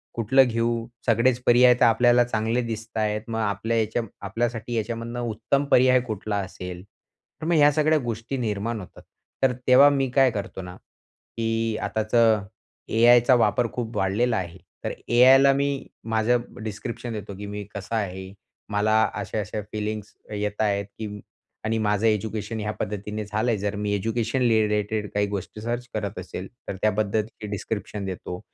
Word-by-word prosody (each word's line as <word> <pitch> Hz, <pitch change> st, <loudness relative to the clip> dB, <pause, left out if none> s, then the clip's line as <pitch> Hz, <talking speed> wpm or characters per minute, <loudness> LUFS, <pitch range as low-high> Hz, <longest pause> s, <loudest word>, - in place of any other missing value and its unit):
कुठलं 120 Hz, +4 st, +4 dB
घेऊ? 115 Hz, 0 st, 0 dB, 0.2 s
सगळेच 120 Hz, +2 st, +3 dB
पर्याय 125 Hz, +1 st, +7 dB
तर -, -, +6 dB
आपल्याला 120 Hz, +1 st, +5 dB
चांगले 115 Hz, 0 st, 0 dB
दिसत 115 Hz, -1 st, -6 dB
आहेत. 105 Hz, -1 st, 0 dB
मग 115 Hz, -1 st, -3 dB
आपल्या 110 Hz, +2 st, -1 dB
ह्याच्या 110 Hz, +1 st, 0 dB, 0.3 s
आपल्यासाठी 115 Hz, +2 st, -2 dB
ह्याच्यामधनं 115 Hz, +1 st, -3 dB
उत्तम 120 Hz, +4 st, 0 dB
पर्याय 130 Hz, 0 st, +6 dB
कुठला 105 Hz, -1 st, -3 dB
असेल?" 90 Hz, -2 st, -6 dB
तर 105 Hz, +8 st, -16 dB
मग 170 Hz, -, +1 dB
ह्या 150 Hz, -1 st, +6 dB
सगळ्या 155 Hz, +1 st, +3 dB
गोष्टी 120 Hz, +1 st, -4 dB
निर्माण 110 Hz, -1 st, -2 dB
होतात. 95 Hz, -, -12 dB, 0.4 s
तर 130 Hz, -1 st, +4 dB
तेव्हा 130 Hz, +3 st, +8 dB
मी 135 Hz, -2 st, 0 dB
काय 130 Hz, 0 st, +4 dB
करतो 100 Hz, -2 st, -5 dB
ना, 90 Hz, 0 st, -9 dB, 0.6 s
की 115 Hz, -1 st, 0 dB
आताचं 110 Hz, -1 st, +2 dB, 0.4 s
ए-आयचा 120 Hz, +3 st, +5 dB
वापर 115 Hz, 0 st, +2 dB
खूप 120 Hz, -1 st, -4 dB
वाढलेला 110 Hz, +5 st, +1 dB
आहे 90 Hz, -1 st, -5 dB, 0.3 s
तर -, -, -2 dB, 0.2 s
ए-आयला 130 Hz, +3 st, +7 dB
मी 140 Hz, 0 st, -1 dB, 0.3 s
माझ्या 110 Hz, +2 st, +3 dB, 0.3 s
डिस्क्रिप्शन 115 Hz, +2 st, -5 dB
देतो 105 Hz, -2 st, -6 dB
की 105 Hz, -, -7 dB
मी 105 Hz, 0 st, -5 dB
कसा 100 Hz, +3 st, -4 dB
आहे 95 Hz, -3 st, -4 dB, 0.4 s
मला 110 Hz, +1 st, +2 dB
अशा-अशा 105 Hz, 0 st, -3 dB
फीलिंग्स 105 Hz, -1 st, -4 dB, 0.2 s
येत 105 Hz, 0 st, -2 dB
आहेत, 100 Hz, -2 st, +1 dB
की 105 Hz, -2 st, -5 dB, 0.5 s
आणि 110 Hz, +1 st, 0 dB
माझं 105 Hz, 0 st, +1 dB
एज्युकेशन 110 Hz, +1 st, -1 dB
या 105 Hz, 0 st, -2 dB
पद्धतीने 105 Hz, +1 st, -4 dB
झाल 105 Hz, +3 st, -1 dB
आहे. 115 Hz, -, +1 dB
जर 100 Hz, +1 st, -2 dB
मी 105 Hz, 0 st, -1 dB
एज्युकेशन 115 Hz, +4 st, -1 dB
रिलेटेड 105 Hz, -1 st, +1 dB
काही 105 Hz, 0 st, +1 dB
गोष्टी 100 Hz, +1 st, -5 dB
सर्च 120 Hz, +2 st, -3 dB
करत 105 Hz, -1 st, -3 dB
असेल 90 Hz, +1 st, -7 dB, 0.2 s
तर -, -, -3 dB
त्याबद्दलची 110 Hz, +1 st, -1 dB
डिस्क्रिप्शन 105 Hz, 0 st, -4 dB
देतो. 90 Hz, -1 st, -5 dB
110 Hz, 155 wpm, -25 LUFS, 105-120 Hz, 0.6 s, तेव्हा